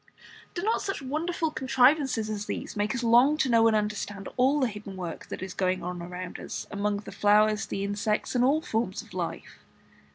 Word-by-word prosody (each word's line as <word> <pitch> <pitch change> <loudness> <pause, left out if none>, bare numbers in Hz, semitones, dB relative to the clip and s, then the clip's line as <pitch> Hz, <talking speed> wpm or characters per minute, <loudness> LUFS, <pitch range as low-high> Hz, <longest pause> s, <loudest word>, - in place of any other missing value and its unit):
Do 350 - -3
not 445 +2 +1
such 390 -8 -3
wonderful 320 +4 -1
contrivances 265 -3 +3
as 210 -1 -4
these - - -4
make 210 +4 0
us 245 - -2
long 245 +6 +5
to 270 - +1
know 230 -1 +5
and 220 - +3
understand 205 -2 -2
all 265 +4 +3
the 260 - +3
hidden 205 -3 -8
work 175 -3 -6
that - - -6
is 190 -1 -6
going 185 -1 0
on 180 0 -4
around 180 +1 -6
us - - -5
among 205 0 -1
the 205 - -10
flowers, 210 +1 +3
the 195 - -3
insects, 205 +2 -1
and 245 -1 +3
all 285 +5 +3
forms 225 +2 -2
of - - -17
life? - - -5
215 Hz, 200 wpm, -28 LUFS, 200-265 Hz, -, long